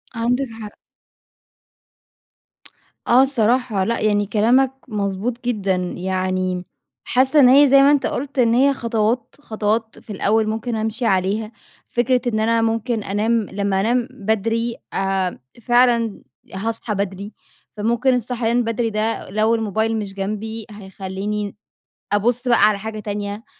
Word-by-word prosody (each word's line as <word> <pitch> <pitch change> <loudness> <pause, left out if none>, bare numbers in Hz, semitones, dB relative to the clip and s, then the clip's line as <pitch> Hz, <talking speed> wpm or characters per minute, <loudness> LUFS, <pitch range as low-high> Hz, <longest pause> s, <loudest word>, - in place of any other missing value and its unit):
عندك 245 +4 0
حق. 210 -1 -7 2.4
آه، 245 +2 +6
الصراحة 245 -5 +1
لأ، 230 +4 -1
يعني 205 -1 +2
كلامك 235 +6 +3 0.2
مضبوط 210 +3 -3
جدًا 200 -6 0 0.2
يعني 185 0 -2 0.4
حاسَّة 265 +4 +3
إن 255 -3 +7
هي 280 +2 +7
زي 275 +1 +7
ما 280 +1 +6
أنت 290 -2 +2
قلت 280 +1 -3
إن 230 -2 +4
هي 275 +3 +4
خطوات 230 -1 -1
خطوات 220 -2 -2
في - - -25
الأوّل 215 +3 +1
ممكن 225 +2 -2
أمشي 220 +2 -2
عليها. 200 +2 0 0.4
فكرة 245 +1 +1
إن 220 -3 0
أنا 230 +1 +2
ممكن 225 0 -1
أنام 205 +4 -1 0.2
لمَّا 200 -1 -1
أنام 240 +3 +1
بدري 225 +1 -1 0.2
آآ، 195 -2 -1 0.2
فعلًا 240 -2 +2 0.3
هاصحى 220 +2 -3
بدري، 200 +1 -4 0.4
فممكن 235 +5 +1
الصحيان 245 0 0
بدري 230 0 -1
ده 215 +1 -2
لو 215 +3 +2
الموبايل 220 0 -1
مش 200 -2 -5
جنبي، 215 +3 -4
هيخليني 200 +1 -5 0.6
أبُصّ 240 +5 +1
بقى 235 - +4
على 210 -2 0
حاجة 215 +1 -6
تانية، 205 +1 -5
220 Hz, 130 wpm, -20 LUFS, 205-240 Hz, 2.4 s, إن